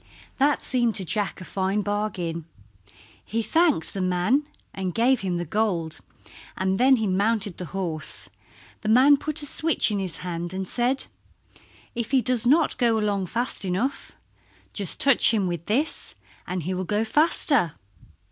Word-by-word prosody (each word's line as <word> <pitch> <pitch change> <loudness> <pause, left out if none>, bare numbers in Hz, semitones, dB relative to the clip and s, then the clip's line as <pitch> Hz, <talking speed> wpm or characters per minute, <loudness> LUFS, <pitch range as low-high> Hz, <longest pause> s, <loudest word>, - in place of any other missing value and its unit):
That 285 +2 +2
seemed 240 -3 0
to 190 - +2
Jack 205 +1 -2
a - - -8
fine 195 +3 -1
bargain. 185 -6 -3 0.8
He 225 +2 -2
thanked 320 - +2
the 195 - -3
man 185 +11 +1 0.3
and 185 -2 -4
gave 250 +3 +3
him 185 -3 -2
the 175 - -3
gold, 170 -4 -1 0.6
and 190 0 0
then 265 +2 +6
he 220 -3 -1
mounted 200 0 0
the 180 - -6
horse. 170 -4 -4 0.5
The 215 - -3
man 260 +6 +6
put 300 +1 -1
a - - +2
switch 310 -4 +2
in 205 - -1
his 185 -3 -1
hand 175 +1 -4
and 190 0 -4
said, 250 +5 -1 0.9
"If 235 -2 -4
he 265 -1 +3
does 245 -2 0
not 310 +5 +3
go 235 -3 +3
along 205 -3 -1
fast 240 +5 -3
enough 195 +9 -2 0.6
just 200 -5 -1
touch 275 -4 +7
him 205 -3 +1
with 170 -2 -4
this 280 +9 -2 0.3
and 180 -2 -3
he 185 +4 -2
will 185 0 -2
go 210 +4 -1
faster." 280 - +2
210 Hz, 165 wpm, -24 LUFS, 185-255 Hz, 0.9 s, touch